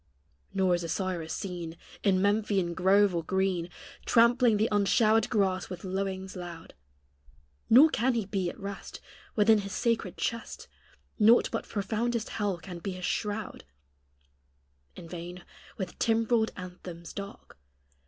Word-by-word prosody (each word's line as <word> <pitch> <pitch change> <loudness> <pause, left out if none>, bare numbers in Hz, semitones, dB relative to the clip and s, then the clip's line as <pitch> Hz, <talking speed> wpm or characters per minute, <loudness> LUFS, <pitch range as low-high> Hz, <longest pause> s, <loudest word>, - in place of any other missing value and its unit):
Nor 190 -2 +2
is 175 0 0
Osiris 170 -1 -3
seen 175 -3 -5 0.2
In 190 -2 +2
Memphian 200 -4 +1
grove 195 +2 +4
or 170 -1 -1
green, 190 -1 0 0.3
Trampling 235 -1 +4
the 215 +2 +2
unshowered 215 +2 +3
grass 190 -4 0
with 180 -2 -7
lowings 190 0 -3
loud, 175 -2 -8 1.0
Nor 285 +7 +8
can 245 +3 +1
he 225 -4 0
be 190 -3 -1
at - - -10
rest 200 0 -7 0.4
Within 220 0 +5
his 200 -1 -6
sacred 230 -1 -1
chest 230 -1 -4 0.5
Naught 225 +3 +5
but 225 - -4
profoundest 225 +3 -1
hell 205 -4 -1
can 175 0 -9
be 190 +2 -4
his 180 0 -5
shroud; 210 0 -3 1.3
In 170 - -10
vain, 175 +1 -8 0.3
with 190 -3 -5
timbrelled 225 -1 +2
anthems 180 -2 -9
dark. 200 - -9
195 Hz, 135 wpm, -29 LUFS, 180-220 Hz, 1.3 s, Nor